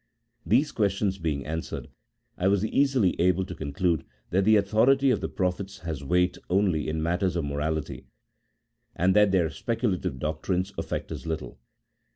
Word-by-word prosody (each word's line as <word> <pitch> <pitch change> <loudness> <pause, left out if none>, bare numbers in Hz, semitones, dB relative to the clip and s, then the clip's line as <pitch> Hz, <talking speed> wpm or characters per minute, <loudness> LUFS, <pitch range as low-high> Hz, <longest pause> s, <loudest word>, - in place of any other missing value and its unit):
These 135 +7 +3
questions 100 -2 0
being 75 -5 -2
answered, 80 +2 -4 0.5
I 90 - 0
was 100 +1 +2
easily 130 -5 +2
able 90 +1 +2
to 90 - -7
con 75 -3 -5
clude, 85 +2 +1 0.3
that 95 +2 +2
the 110 +1 +6
authority 120 +7 +4
of 110 - 0
the - - -2
prophets 95 +2 -2
has 80 -5 -5
weight 90 +5 +1
only 90 -5 +1
in 80 0 -2
matters 90 +2 0
of 85 -4 -1
morality, 75 +1 -3 0.9
and 95 +3 +2
that 105 -1 +5
their 85 -4 +2
speculative 115 - -2
doctrines 90 +7 -2
affect - - -4
us - - -6
little. 75 -7 -5
90 Hz, 160 wpm, -27 LUFS, 80-100 Hz, 0.9 s, the